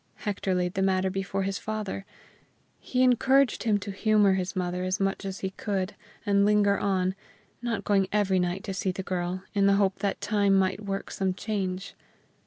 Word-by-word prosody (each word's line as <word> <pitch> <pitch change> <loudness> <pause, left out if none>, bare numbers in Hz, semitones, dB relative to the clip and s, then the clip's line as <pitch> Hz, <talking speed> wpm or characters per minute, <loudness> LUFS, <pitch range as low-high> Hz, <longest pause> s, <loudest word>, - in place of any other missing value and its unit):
Hector 200 -3 -2
laid 180 0 0
the 190 - -1
matter 190 0 +2
before 195 0 -2
his 195 0 -2
father. 210 -2 -4 0.7
He 255 0 0
encouraged 260 0 +3
him 215 -2 +3
to 200 - -5
humor 210 0 +3
his 190 0 -2
mother 180 0 -2
as 185 +1 -1
much 195 0 -1
as 195 0 -5
he 190 - -2
could, 195 0 -3 0.3
and 200 -1 +3
linger 205 -1 +3
on, 185 -2 +1 0.5
not 235 -3 -2
going 195 -2 +2
every 200 -3 +2
night 180 +2 -1
to 195 - -4
see 190 0 -1
the 190 +1 -5
girl, 180 0 -3
in 200 -1 +3
the 200 - +5
hope 195 -1 +1
that 200 -1 -1
time 200 -2 +2
might 190 +2 +1
work 195 -1 -4
some 190 -1 -1
change. 195 -3 -3
195 Hz, 190 wpm, -27 LUFS, 185-205 Hz, 0.7 s, the